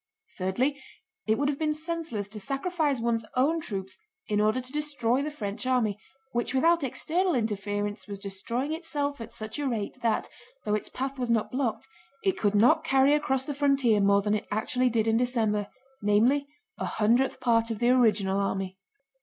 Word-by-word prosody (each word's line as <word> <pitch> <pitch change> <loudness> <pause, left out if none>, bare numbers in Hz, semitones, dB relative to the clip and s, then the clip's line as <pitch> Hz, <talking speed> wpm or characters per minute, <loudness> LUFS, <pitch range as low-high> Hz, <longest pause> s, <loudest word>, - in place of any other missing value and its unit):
Thirdly, 250 +10 0 0.5
it 220 0 +3
would 285 - +1
have 285 -1 -1
been 305 -1 +1
senseless 315 - -4
to 215 +1 -7
sacrifice 285 - -1
one's 230 -1 0
own 305 +6 +2
troops 195 -8 -5 0.3
in 210 -1 +1
order 215 +4 +2
to 255 0 -7
destroy 280 -4 0
the 295 - -2
French 225 -4 -5
army, 225 -6 +1 0.3
which 240 +2 -1
without 335 +4 +4
external 340 +6 0
interference 205 -2 -2
was 200 -1 -5
destroying 225 +8 -3
itself 290 -5 -2
at 225 - -7
such 220 +4 -5
a 290 - -1
rate 230 0 -3
that, 230 -2 +1 0.4
though 210 - 0
its 210 - -1
path 270 +1 -4
was 245 -1 -2
not 220 -2 +1
blocked, 255 -1 -2 0.4
it 385 -2 +2
could 205 -1 +1
not 305 +10 +5
carry 270 -2 +4
across 270 -3 +1
the 290 - -3
frontier 275 -6 +3
more 200 0 +4
than 210 0 +1
it 215 - -2
actually 250 +4 +1
did 225 -2 +1
in 225 0 +3
December, 225 -4 +1 0.3
namely 235 +8 +3 0.3
a - - -1
hundredth 235 +6 +2
part 230 -2 +2
of 225 - -2
the 240 +3 +3
original 210 -6 +3
army. 195 -1 -2
240 Hz, 180 wpm, -28 LUFS, 210-280 Hz, 0.5 s, not